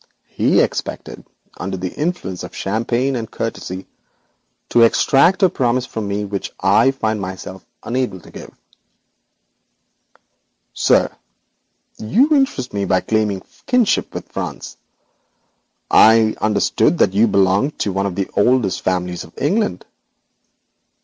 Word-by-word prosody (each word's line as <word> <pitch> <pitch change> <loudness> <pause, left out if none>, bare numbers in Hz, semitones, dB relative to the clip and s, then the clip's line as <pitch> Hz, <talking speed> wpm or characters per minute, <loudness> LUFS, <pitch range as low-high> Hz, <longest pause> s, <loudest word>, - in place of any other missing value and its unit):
He - - +2
expected, - - -4 0.3
under 95 +1 -4
the 90 0 -5
influence 150 - -3
of 90 - -9
champagne 120 +6 -1
and 115 -2 -4
courtesy, 95 -5 -5 0.8
to 120 - +4
extract 140 - +4
a - - +8
promise 125 -3 0
from 110 -4 -5
me 100 +1 -2
which 100 -1 -5
I - - +4
must 135 0 0
find 110 -3 -1
myself 95 0 -7 0.2
unable 125 -6 -2
to - - -16
give. - - -10 2.2
'Sir, - - +2 0.8
you 225 - +2
interest 265 - 0
me 100 -1 -1
by 95 0 +2
claiming 105 -4 -1 0.2
kinship 250 -4 +1
with - - -6
France. - - -6 1.2
I 110 - +7
had 110 -1 +2
understood 105 -1 +1
that - - +2
you 110 +4 +4
belonged 100 +7 +2
to 100 - -1
one 100 +1 0
of 95 - -5
the 100 -1 -2
oldest 115 -2 +2
families 90 -1 -2
of - - -15
England.' 150 - -1
110 Hz, 130 wpm, -19 LUFS, 95-130 Hz, 2.2 s, a